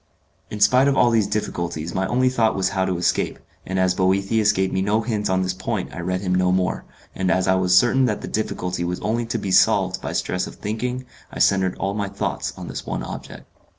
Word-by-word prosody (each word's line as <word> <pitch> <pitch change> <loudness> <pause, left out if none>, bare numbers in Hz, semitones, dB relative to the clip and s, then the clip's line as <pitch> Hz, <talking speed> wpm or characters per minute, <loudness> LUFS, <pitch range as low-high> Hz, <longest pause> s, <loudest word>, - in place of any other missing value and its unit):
In 105 - -6
spite 125 +6 +5
of 140 - +2
all 120 - +4
these 110 -3 +2
difficulties 85 -5 -3
my 95 0 0
only 130 +1 +2
thought 115 -4 +2
was 95 0 +1
how 95 -1 0
to 90 -2 -1
escape, 90 - 0 0.3
and 95 - -2
as 95 -1 +3
Boethius 100 +4 +2
gave 95 -2 -1
me 95 - +1
no 105 +3 +1
hints 110 -3 -2
on 95 0 +1
this 90 0 -1
point 100 +1 -4
I - - -7
read 90 +1 -2
him 90 -2 -1
no 90 0 +2
more, 90 0 0 0.3
and 95 -1 -1
as 95 0 +2
I 95 - +4
was 90 -1 +3
certain 130 +5 +4
that - - -1
the - - -6
difficulty 90 -4 -2
was 90 +1 -2
only 115 +3 -1
to - - -2
be 95 - -3
solved 95 - +3
by - - -4
stress 90 0 -1
of - - -10
thinking 125 +4 -4 0.3
I - - -8
centered 95 -2 +2
all 100 +1 -2
my 100 -1 -2
thoughts 100 - -3
on - - -7
this - - -6
one - - -4
object. - - -8
95 Hz, 235 wpm, -22 LUFS, 90-110 Hz, 0.3 s, spite